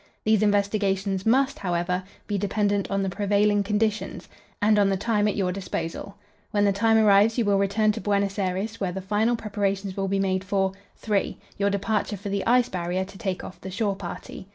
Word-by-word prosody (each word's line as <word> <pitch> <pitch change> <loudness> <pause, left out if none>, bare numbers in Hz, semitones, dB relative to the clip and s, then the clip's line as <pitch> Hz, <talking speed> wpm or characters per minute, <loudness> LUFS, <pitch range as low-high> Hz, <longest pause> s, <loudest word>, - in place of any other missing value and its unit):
These 215 -1 +3
investigations 200 -1 +1
must, 270 +4 +3
however, 180 0 -1 0.2
be 205 - -2
dependent 205 0 0
on 195 0 0
the - - -1
prevailing 205 +1 +2
conditions, 210 +1 -1 0.3
and 210 0 +4
on 200 -1 +4
the 195 - +1
time 210 +1 +1
at 210 - 0
your 185 -3 0
disposal. 185 0 -5 0.3
When 205 -1 +2
the 200 - +4
time 225 +2 +3
arrives 215 +1 +5
you 235 - +2
will 200 -1 +3
return 205 +2 +2
to - - -5
Buenos 200 0 0
Aires, 195 +4 -2
where 190 -3 -1
the 190 - -4
final 210 +5 +1
preparations 200 -3 -2
will 195 -1 -1
be 195 +1 0
made 190 -1 0
for 195 -1 0 0.3
"3. 205 -3 -1 0.2
Your 200 0 +2
departure 205 +1 -1
for 200 +2 -6
the 200 0 -1
Ice 245 +1 +4
Barrier 180 +1 -2
to 195 0 -13
take 190 -2 -3
off 185 - -10
the 190 - -6
shore 200 +1 -1
party. 185 0 -8
200 Hz, 200 wpm, -25 LUFS, 195-210 Hz, 0.3 s, arrives